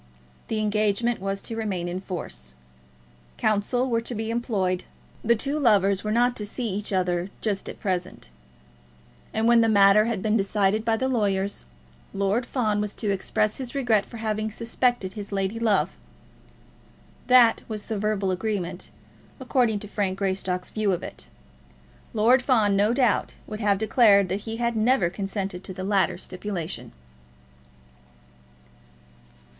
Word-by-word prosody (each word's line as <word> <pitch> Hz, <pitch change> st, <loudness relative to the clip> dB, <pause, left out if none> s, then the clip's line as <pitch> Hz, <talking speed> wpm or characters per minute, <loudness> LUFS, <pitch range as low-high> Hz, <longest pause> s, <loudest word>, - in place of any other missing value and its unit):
The 220 Hz, -, -2 dB
engagement 215 Hz, +2 st, +1 dB
was 195 Hz, +1 st, -3 dB
to 225 Hz, -, -4 dB
remain 195 Hz, -6 st, -2 dB
in 175 Hz, +1 st, -3 dB
force. 65 Hz, -, -5 dB, 0.8 s
Counsel 215 Hz, +5 st, +1 dB
were 230 Hz, -2 st, +1 dB
to 235 Hz, +1 st, -4 dB
be 220 Hz, +1 st, -3 dB
employed. 200 Hz, -6 st, -1 dB, 0.4 s
The 235 Hz, +1 st, +4 dB
two 280 Hz, +7 st, -2 dB
lovers 200 Hz, -6 st, +3 dB
were 215 Hz, -, -2 dB
not 245 Hz, +2 st, +2 dB
to 210 Hz, -, -4 dB
see 235 Hz, +2 st, -3 dB
each 205 Hz, +2 st, -4 dB
other 180 Hz, -1 st, 0 dB
just 205 Hz, -3 st, -2 dB
at -, -, -9 dB
present. 180 Hz, -, -3 dB, 1.0 s
And 220 Hz, +1 st, 0 dB
when 235 Hz, -1 st, +6 dB
the 225 Hz, -, +3 dB
matter 200 Hz, 0 st, +6 dB
had 230 Hz, -5 st, -2 dB
been 215 Hz, 0 st, +2 dB
decided 205 Hz, 0 st, +1 dB
by 225 Hz, -1 st, +1 dB
the 260 Hz, -, 0 dB
lawyers, 200 Hz, -, 0 dB, 0.5 s
Lord 200 Hz, +5 st, 0 dB
Fawn 215 Hz, -5 st, 0 dB
was 210 Hz, -1 st, -4 dB
to 210 Hz, -3 st, -1 dB
express 205 Hz, +2 st, 0 dB
his 260 Hz, 0 st, -6 dB
regret 235 Hz, -7 st, +2 dB
for 235 Hz, -, -11 dB
having 215 Hz, -1 st, -2 dB
suspected 230 Hz, -2 st, -1 dB
his 205 Hz, -1 st, -7 dB
lady 195 Hz, +3 st, -1 dB
love! 220 Hz, -4 st, +1 dB, 1.3 s
That 250 Hz, -3 st, +6 dB
was 215 Hz, -2 st, -5 dB
the 220 Hz, -3 st, -3 dB
verbal 205 Hz, -2 st, 0 dB
agreement, 185 Hz, -2 st, -3 dB, 0.5 s
according 245 Hz, -4 st, +1 dB
to 210 Hz, -, -7 dB
Frank 195 Hz, -2 st, -2 dB
Greystock's 190 Hz, -2 st, -2 dB
view 215 Hz, -3 st, +1 dB
of 175 Hz, -, -3 dB
it. -, -, -7 dB, 0.8 s
Lord 235 Hz, +4 st, +4 dB
Fawn, 220 Hz, -6 st, +3 dB
no 205 Hz, +3 st, +3 dB
doubt, 245 Hz, -3 st, +1 dB
would 215 Hz, -1 st, -7 dB
have 205 Hz, -2 st, +2 dB
declared 210 Hz, -3 st, +4 dB
that 195 Hz, +2 st, -3 dB
he 225 Hz, -, -4 dB
had 235 Hz, 0 st, 0 dB
never 220 Hz, -5 st, +2 dB
consented 195 Hz, -1 st, -4 dB
to 190 Hz, -, -8 dB
the 185 Hz, -, -5 dB
latter 195 Hz, 0 st, +1 dB
stipulation. 185 Hz, -3 st, -5 dB
210 Hz, 150 wpm, -25 LUFS, 195-230 Hz, 1.3 s, when